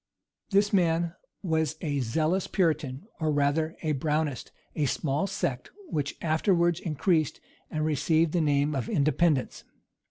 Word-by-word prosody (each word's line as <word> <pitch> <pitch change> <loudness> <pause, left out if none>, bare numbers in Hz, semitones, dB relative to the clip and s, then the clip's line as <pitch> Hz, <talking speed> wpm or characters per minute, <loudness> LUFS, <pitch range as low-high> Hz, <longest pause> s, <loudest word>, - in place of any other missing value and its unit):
This 205 0 +2
man 170 -2 +2 0.3
was 160 -3 0
a 145 -4 -1
zealous 155 +10 0
Puritan, 155 -6 0
or 155 -2 +1
rather 145 +2 +1
a 155 -1 +1
Brownist, 150 -1 -1 0.3
a 150 - +1
small 145 +5 0
sect, 130 -9 -3 0.2
which 140 -2 -2
afterwards 170 +1 +2
increased, 160 -1 0 0.3
and 155 0 -1
received 155 +2 +2
the 175 - +1
name 145 0 +2
of 130 -5 -2
"Independents." 150 -1 +1
155 Hz, 130 wpm, -28 LUFS, 145-170 Hz, 0.3 s, This